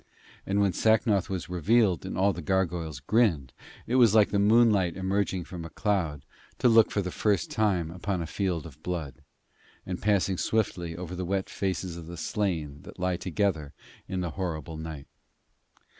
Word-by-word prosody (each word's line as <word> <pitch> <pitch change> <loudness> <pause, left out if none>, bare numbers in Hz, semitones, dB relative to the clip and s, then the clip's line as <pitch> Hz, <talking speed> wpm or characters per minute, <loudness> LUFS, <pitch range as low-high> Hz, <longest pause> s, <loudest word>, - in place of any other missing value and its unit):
And 100 +1 +1
when 100 -2 +2
Sacnoth 110 -1 +2
was 95 -3 -3
revealed 90 - +2
and - - -4
all 100 +2 +3
the 85 - -6
gargoyles 85 -4 -1
grinned, 80 - +1 0.3
it 125 - +1
was 115 -4 +6
like 105 -2 +6
the 100 - +2
moonlight 105 -4 +4
emerging 95 -1 -1
from 85 -1 -8
a 85 - -7
cloud 85 -8 -1 0.3
to - - +3
look 115 -2 +6
for 100 - -1
the 90 - -4
first 100 -5 0
time 95 -7 +1
upon 90 +2 -3
a 85 - -3
field 85 -1 -2
of 80 -6 -12
blood, 85 -6 -5 0.6
and 90 -1 -5
passing 100 -3 +1
swiftly 90 -6 -1
over 90 0 -6
the 90 - -3
wet 95 +1 -2
faces 95 -2 -3
of 80 -2 -9
the 85 0 -8
slain 80 -6 -2
that - - -12
lie 90 -1 0
together 85 -6 -1 0.3
in 95 -1 -2
the 85 -2 -3
horrible 80 -4 -4
night. 80 -3 -7
90 Hz, 175 wpm, -28 LUFS, 85-100 Hz, 0.6 s, was